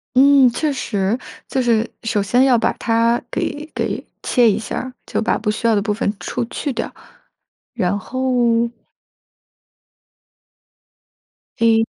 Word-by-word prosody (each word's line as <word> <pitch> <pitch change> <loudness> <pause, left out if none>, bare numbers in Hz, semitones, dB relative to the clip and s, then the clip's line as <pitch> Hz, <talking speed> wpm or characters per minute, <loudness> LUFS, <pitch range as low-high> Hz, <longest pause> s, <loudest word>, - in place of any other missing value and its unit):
嗯， 275 0 +7
确 300 +4 -1
实。 210 -4 -1 0.3
就 265 - -1
是 230 -2 +2
首 225 -3 0
先 245 +7 +3
要 260 -2 +5
把 - - +1
它 230 +1 +1
给 295 +1 -3
给 - - -2 0.2
切 240 -3 +4
一 200 - +1
下 - - -5
儿， 260 0 -5
就 - - -1
把 220 - +1
不 210 -1 -2
需 215 +2 -3
要 225 - +4
的 205 - +2
部 210 +1 -1
分 205 - 0
出 240 - -3
去 280 +4 -4
掉， - - -3 0.8
然 190 +2 0
后 240 0 +1 2.9
诶。 225 -1 +4
235 Hz, 150 characters per minute, -19 LUFS, 220-255 Hz, 2.9 s, 嗯